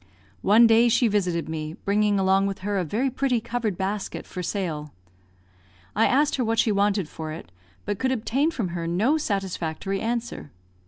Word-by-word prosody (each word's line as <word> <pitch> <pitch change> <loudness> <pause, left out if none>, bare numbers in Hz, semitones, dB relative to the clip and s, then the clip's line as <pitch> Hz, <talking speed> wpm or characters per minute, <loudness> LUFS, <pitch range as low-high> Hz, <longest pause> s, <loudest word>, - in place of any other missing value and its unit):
One 220 - +6
day 230 +1 +5
she 235 +1 +3
visited 180 -5 0
me, 155 0 -5
bringing 205 0 +2
along 195 +1 +3
with 195 -1 -5
her 205 -1 0
a - - 0
very 235 - -1
pretty 260 -2 +1
covered 230 -4 -3
basket 195 +1 -3
for 180 - -6
sale. 165 -6 -4 1.0
I 220 - +4
asked 290 +3 +2
her 255 - +1
what 225 0 0
she 220 - +3
wanted 200 -3 +1
for 155 0 -7
it, 125 - -9 0.3
but 205 -1 -3
could 260 0 +1
obtain 260 +5 +1
from 230 - -3
her 170 -1 -4
no 220 - +2
satisfactory 195 - -2
answer. 235 -6 -3
205 Hz, 175 wpm, -25 LUFS, 180-235 Hz, 1.0 s, One